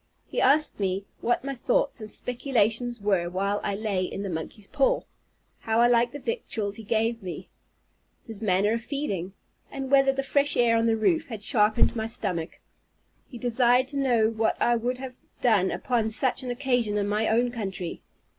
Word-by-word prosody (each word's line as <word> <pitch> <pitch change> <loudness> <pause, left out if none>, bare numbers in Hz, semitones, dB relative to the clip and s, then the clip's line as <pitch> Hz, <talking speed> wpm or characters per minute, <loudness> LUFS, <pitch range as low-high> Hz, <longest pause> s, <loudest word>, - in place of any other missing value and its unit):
He - - -2
asked 295 0 +3
me, 195 0 -1
what 240 +1 0
my 275 0 -3
thoughts - - 0
and 215 - -7
speculations 240 -1 0
were 195 -4 +1
while 200 +3 -1
I 200 - -1
lay 205 -3 -1
in 195 +2 -4
the 195 - -4
monkey's 165 +5 -5
paw? 275 +5 +1 0.6
how 225 0 0
I 240 - +6
liked 240 +1 +3
the 290 - -6
victuals 225 - -2
he 225 - -8
gave 225 +2 0
me? 180 -3 -7 0.8
his 225 -3 -8
manner 205 +1 +2
of 230 - -2
feeding? 200 - -3 0.4
and 270 -1 -6
whether 270 -1 +5
the 270 0 -2
fresh 285 +1 +2
air 235 -1 +4
on 230 0 +2
the 225 0 +2
roof 320 +8 +1
had 220 -4 -6
sharpened 215 +2 +3
my 220 -1 -2
stomach? 175 -7 -4 0.7
He 245 - -10
desired 245 +1 +3
to 285 - -4
know 240 -5 +3
what 225 0 0
I 240 - +3
would 245 +2 -2
have 260 0 -7 0.3
done 205 -6 +3
upon 230 -1 -1
such 250 +4 +1
an 255 - -6
occasion 245 -4 0
in 205 -1 0
my 210 +2 0
own 240 +2 +2
country? 190 -7 -5
230 Hz, 185 wpm, -26 LUFS, 205-255 Hz, 0.8 s, I